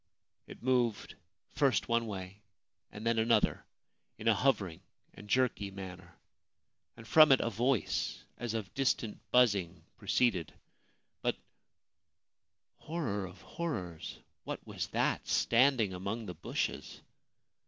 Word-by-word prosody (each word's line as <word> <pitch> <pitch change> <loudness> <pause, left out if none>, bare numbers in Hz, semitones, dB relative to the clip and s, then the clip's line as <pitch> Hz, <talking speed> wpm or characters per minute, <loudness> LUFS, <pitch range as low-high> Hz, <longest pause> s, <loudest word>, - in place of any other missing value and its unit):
It - - -12
moved 125 -3 +1 0.4
first 135 -7 +2
one 115 0 +1
way 95 0 -7 0.5
and 105 +2 -8
then 115 -1 +2
another, 115 +1 +2 0.5
in 110 - -5
a 115 - +7
hovering 100 -8 +1 0.3
and 105 - -13
jerky 125 -5 +1
manner, 95 -3 -9 0.8
and 115 - -12
from 155 +5 +8
it 135 - +7
a 115 - -1
voice 120 +2 0
as 120 -2 -4
of 105 -5 -4
distant 125 -5 0
buzzing 100 -9 +3 0.2
proceeded; 100 -11 +1 0.7
but - - 0 0.7
— - - -55
horror 115 - -2
of - - -13
horrors! 95 - -5
— - - -50
what - - -6
was - - -4
that - - 0
standing 120 -4 +3
among 100 +5 -4
the 90 - -5
bushes 80 - -3
110 Hz, 125 wpm, -32 LUFS, 95-125 Hz, 0.8 s, from